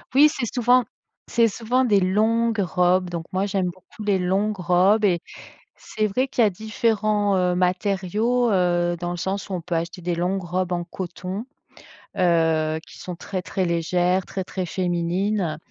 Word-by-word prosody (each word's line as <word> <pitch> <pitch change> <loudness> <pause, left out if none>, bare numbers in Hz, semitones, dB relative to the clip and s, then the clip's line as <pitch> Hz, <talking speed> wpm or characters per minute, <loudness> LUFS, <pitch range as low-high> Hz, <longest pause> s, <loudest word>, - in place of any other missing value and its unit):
Oui, 300 +2 +7
c'est 265 -6 -3
souvent 245 +1 +4 0.5
c'est 230 -1 +3
souvent 240 +5 0
des 210 -5 +4
longues 220 +4 +1
robes, 180 0 +2
donc 170 -1 -5
moi, 190 +2 +1
j'aime 195 -2 0
beaucoup 185 +4 -8
les 200 -2 +2
longues 195 +4 0
robes 185 +4 +3
et 175 -4 +3 0.6
c'est 215 -1 -2
vrai 255 +6 -1
qu'il 245 - 0
y 215 - +6
a - - +2
différents, 215 0 0
heu, 180 -1 +2
matériaux, 200 +6 +1
heu, 175 -2 +2
dans 175 0 -3
le 175 - -4
sens 195 +3 -3
où - - -4
on 180 - -1
peut 170 0 -4
acheter 170 +2 -3
des 175 0 -1
longues 185 +3 -1
robes 180 +1 -2
en 175 -1 -1
coton, 185 +3 -6 0.7
heu, 160 -3 +2
qui - - -14
sont 180 -1 -6
très, 185 +2 -5
très 185 0 -2
légères, 175 +2 +1
très, 190 - -4
très 185 -1 -4
féminines 175 0 -1
185 Hz, 175 wpm, -23 LUFS, 175-210 Hz, 0.7 s, Oui